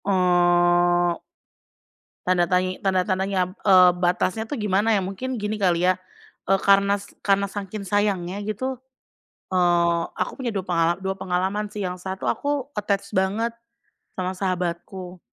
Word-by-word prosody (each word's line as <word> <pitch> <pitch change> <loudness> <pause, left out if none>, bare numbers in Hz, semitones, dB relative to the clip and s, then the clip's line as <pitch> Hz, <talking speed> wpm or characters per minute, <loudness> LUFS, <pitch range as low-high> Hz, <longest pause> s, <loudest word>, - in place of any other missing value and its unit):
Oh. 175 -2 +3 1.0
Tanda 180 -1 +3
tanyi 185 +1 0
tanda-tandanya 190 0 +1
b - - -13
eee, 185 -3 +7
batasnya 180 +4 0
tuh 225 - -6
gimana 210 +2 +2
ya, 200 - +2
mungkin 215 +6 -4
gini 210 +1 -2
kali 180 -3 +2
ya. 185 - +2 0.5
Eee, 195 +1 +2
karenas 200 0 +3 0.2
karena 200 0 +2
saking 205 +1 -6
sayangnya 200 -2 0
gitu, 255 +5 -3 0.7
eee, 175 -2 +2
aku - - -3
punya 245 -4 -3
dua 195 - -1
pengala 170 -2 +1
dua 190 0 -3
pengalaman 190 +4 -1
sih, 210 0 -6
yang 180 -1 -3
satu 190 +1 -3
aku 285 -1 -2
attached 200 -1 -1
banget 200 +5 0 0.6
sama 185 0 -2
sahabatku. 180 0 -3
190 Hz, 135 wpm, -23 LUFS, 180-200 Hz, 1.0 s, eee